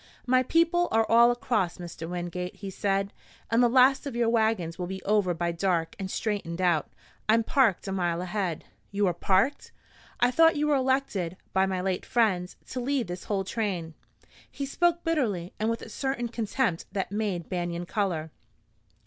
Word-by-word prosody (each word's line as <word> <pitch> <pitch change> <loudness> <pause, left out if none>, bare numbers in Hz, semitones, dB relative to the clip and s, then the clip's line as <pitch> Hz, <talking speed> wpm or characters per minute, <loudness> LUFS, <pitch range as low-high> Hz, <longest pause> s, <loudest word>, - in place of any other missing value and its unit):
"My 255 0 +4
people 335 +6 +2
are 225 0 +3
all 235 +1 +6
across, 230 -7 0
Mr. 170 -2 -7
Wingate," 180 0 -4
he 195 -2 -7
said, 195 +1 -1 0.4
and 230 +1 +4
the 240 - +5
last 265 +3 +4
of 265 - -5
your 235 -1 +2
wagons 220 -7 +1
will 180 - -2
be 190 +1 -6
over 200 -4 +2
by 170 +1 -1
dark 170 -2 -1
and 190 -1 -4
straightened 195 -5 -3
out. 175 -5 +2 0.4
I'm 225 +1 +5
parked 225 - +2
a - - -2
mile 175 -3 0
ahead." 180 -2 -2 0.3
"You 205 0 0
are 180 - +2
parked? 195 - +1 0.5
I 245 +1 +4
thought 325 +4 +5
you 295 0 +1
were 300 -1 +3
elected 260 -10 0 0.2
by 190 0 +3
my 185 -1 -1
late 185 -1 -1
friends 195 -7 +1 0.2
to 255 - -3
lead 265 0 0
this 180 0 -7
whole 195 -2 -1
train." 190 -6 -3 0.6
He 280 - -5
spoke 345 +4 +1
bitterly 225 - -1
and 215 +1 +1
with 230 0 -2
a - - -9
certain 240 0 -2
contempt 225 -4 -1
that 195 -2 -2
made 200 -6 -2
Banion 175 -1 -3
color. 170 -5 -2
200 Hz, 180 wpm, -27 LUFS, 180-245 Hz, 0.6 s, all